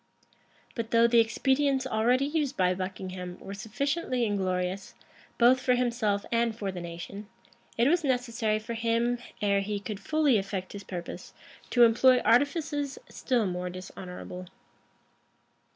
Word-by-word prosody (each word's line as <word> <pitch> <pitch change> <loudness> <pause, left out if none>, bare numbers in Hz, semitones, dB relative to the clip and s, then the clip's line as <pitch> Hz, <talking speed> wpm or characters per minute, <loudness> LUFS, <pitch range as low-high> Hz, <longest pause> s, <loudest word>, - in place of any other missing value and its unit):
But 230 -2 -4
though 230 0 +5
the 235 0 +5
expedients 265 +4 +2
already 250 +2 +2
used 295 -2 -1
by 185 -1 +3
Buckingham 185 -1 -6
were 195 - -8
sufficiently 250 +5 -1
inglorious, 190 -2 -2 0.4
both 250 +2 +5
for 250 0 +2
himself 235 -5 0
and 230 -1 +1
for 200 -3 -3
the 180 -1 -6
nation, 175 +4 -7 0.5
it 235 +2 +4
was 340 +3 +3
necessary 240 -5 0
for 220 +2 -6
him, 230 +1 0 0.2
ere 200 -1 +3
he 205 +1 -3
could 205 0 -6
fully 300 -6 +2
effect 195 -1 -5
his 200 -1 -7
purpose, 175 -2 -7 0.3
to 245 - +5
employ 250 +3 +6
artifices 285 +4 +1
still 245 -4 0
more 180 -1 -3
dishonorable. 180 0 -8
230 Hz, 135 wpm, -28 LUFS, 195-255 Hz, 0.5 s, employ